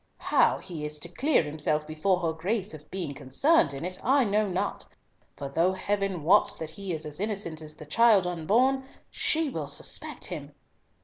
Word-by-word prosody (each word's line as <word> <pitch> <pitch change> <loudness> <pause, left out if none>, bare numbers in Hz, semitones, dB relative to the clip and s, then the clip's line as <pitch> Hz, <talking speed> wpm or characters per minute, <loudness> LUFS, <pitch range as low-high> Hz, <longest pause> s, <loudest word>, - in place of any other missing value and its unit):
How - - +3
he 170 -5 -7
is 150 0 -3
to 160 +3 -4
clear 270 - +2
himself 150 0 -1
before 170 +4 0
her 165 -2 0
Grace 190 +5 -2
of 150 -1 -12
being 175 -6 -4
concerned 140 - +2
in 140 +4 -5
it, 185 0 -3
I 270 +2 +4
know 210 -1 +1
not, 190 +2 -2 0.5
for 140 - -5
though 165 +7 +1
Heaven 195 -3 -2
wots 195 +6 +4
that 160 -1 -6
he 195 +3 -5
is 160 -2 -3
as 150 +1 -5
innocent 195 -6 -3
as 155 -1 -7
the 155 - -11
child 210 +3 +4
unborn, 225 +11 +2 0.3
she 320 0 +1
will - - -4
suspect - - -1
him!" - - -6
180 Hz, 185 wpm, -28 LUFS, 155-205 Hz, 0.5 s, I